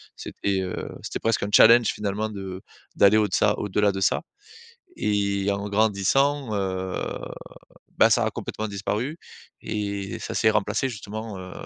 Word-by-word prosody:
C'était, 95 -1 -2
heu, 90 -1 -4 0.2
c'était - - -4
presque 115 -1 0
un 100 - -2
challenge, 115 -1 +7
finalement, 105 +1 -2
de 95 -2 -7 0.3
d'aller 100 +2 +6
au 105 -1 +3
de 95 - -11
ça 105 0 +3
au-delà 105 0 +1
de 95 - -4
ça 95 - +2 0.8
et 100 -1 0
en 100 +1 -2
grandissant, 110 +5 +1
heu, 95 -1 -2 1.0
bah, - - +6
ça - - +3
a - - +1
complètement 110 0 -5
disparu 105 - -3 0.4
et 100 -2 -4
ça - - -5
s'est 110 - +4
remplacé, 105 +4 0
justement, 110 -2 -6
heu, 90 0 -9
105 Hz, 155 wpm, -25 LUFS, 100-110 Hz, 1.0 s, challenge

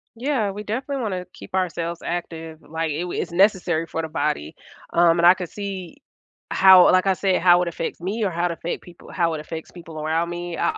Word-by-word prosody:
Yeah, 235 -4 -1
we 205 +2 -7
definitely 260 +6 -3
wanna 185 -4 -3
keep - - -9
ourselves 170 -2 -2
active, 165 -2 -5
like, 160 0 -3
i 150 - -3
w 175 0 -3
it's - - -6
necessary 175 -3 +2
for 165 - -3
the 160 - -5
body, 145 - -2 0.4
um, 170 0 +4
and 170 - +4
I 175 - +9
could 180 -3 -6
see 200 +3 -6 0.6
how 190 -2 +8
like, 185 +1 +3
I 190 - +4
said, 190 0 0
how 175 0 +6
it 175 - -1
affects 165 0 -5
me 205 +5 -2
or - - +1
how 175 0 -1
it - - -3
affect 170 +1 -5
people 175 -1 -15
how 170 -2 0
it - - -5
affects 160 +1 -8
people 165 -3 -9
around 160 +2 0
me. 175 0 -5
I 170 - 0
175 Hz, 225 wpm, -23 LUFS, 165-190 Hz, 0.6 s, I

